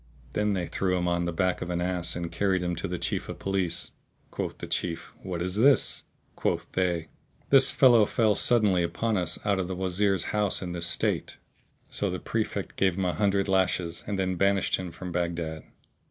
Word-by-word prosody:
Then 105 -1 +1
they 90 -3 -1
threw 90 +1 -1
him 90 0 -1
on 85 0 0
the 85 - -1
back 90 +1 0
of 90 - -4
an 85 -1 -1
ass 90 -1 -1
and 85 -1 -4
carried 95 -2 +1
him 90 -1 -1
to 95 - -3
the 90 -1 -3
Chief - - -3
of - - -5
Police. 95 -3 -1 0.4
Quoth - - -4
the - - -6
Chief, 85 -2 -3
"What 90 -2 -4
is 90 +2 -3
this?" 135 +3 +3 0.3
Quoth - - -1
they, 85 -3 0 0.4
"This 135 -1 +7
fellow 120 -5 +5
fell 110 -3 +2
suddenly 105 -6 +3
upon 110 +6 -1
us 90 -4 -1
out 100 -2 +2
of 90 - -1
the 95 - -4
Wazir's 95 0 0
house[FN#649] 105 -2 +2
in 90 - -4
this 85 -1 -1
state." - - -1 0.5
So - - +2
the - - -2
Prefect - - -3
gave 95 -2 +2
him 95 - 0
an 90 - -1
hundred 100 -1 +2
lashes 95 -3 0
and 100 -1 -2
then 95 -1 -1
banished 100 +1 +2
him 90 -2 -6
from 90 +1 -7
Baghdad. 85 -2 -3
90 Hz, 200 wpm, -27 LUFS, 85-100 Hz, 0.5 s, This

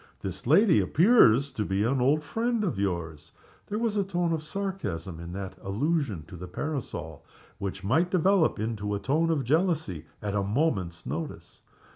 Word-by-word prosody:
"This - - -5
lady 205 -6 +6
appears 145 - +5
to 105 - -2
be 95 0 0
an 125 +3 +1
old 145 +4 +3
friend 225 +9 -1
of 160 - -1
yours." 85 -6 -3 0.3
There 210 - -3
was 225 -2 0
a 200 - +2
tone 175 -3 0
of 160 - -1
sarcasm 155 - -4
in 85 +1 -7
that 95 0 -6
allusion 115 - -1
to 85 - -11
the 90 +1 -7
parasol, 100 - -5 0.4
which 100 -1 -4
might 160 - +2
develop 185 -1 +3
into 105 -2 -2
a - - -2
tone 155 +8 +1
of 155 -4 +1
jealousy 150 - 0
at 105 -1 -3
a 105 - +1
moment's 100 - -1
notice. 150 - -6
135 Hz, 170 wpm, -28 LUFS, -, 0.4 s, lady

